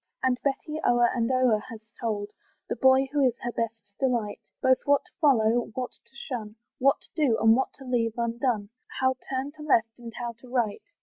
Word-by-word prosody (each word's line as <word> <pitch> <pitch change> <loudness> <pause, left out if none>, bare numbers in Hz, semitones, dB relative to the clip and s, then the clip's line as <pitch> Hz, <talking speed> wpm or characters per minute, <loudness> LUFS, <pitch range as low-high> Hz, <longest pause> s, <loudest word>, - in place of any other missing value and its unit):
And 255 -1 +2
Betty 300 +3 -2
o'er 240 0 +4
and 235 0 +1
o'er 255 -4 +3
has 220 -2 -11
told 210 -4 -2 0.4
The - - -2
boy 265 +1 +5
who 290 -1 +2
is 245 -3 +2
her 240 - -2
best 225 -3 -4
delight, 235 -6 0 0.2
Both 260 0 +4
what 285 0 +3
to - - -24
follow, 240 -5 +4
what 255 -2 -3
to - - -27
shun, 230 -6 -6 0.2
What 275 +2 +2
do, 280 -8 +3
and 225 0 +6
what 265 - 0
to 270 - -12
leave 235 -3 0
undone, 235 -2 -1 0.3
How 260 0 +3 0.2
turn 265 +1 -2
to - - -10
left, 230 -6 +1
and 235 -1 -8
how 240 -1 -3
to 255 - -13
right. 235 -5 0
245 Hz, 195 wpm, -27 LUFS, 225-265 Hz, 0.4 s, and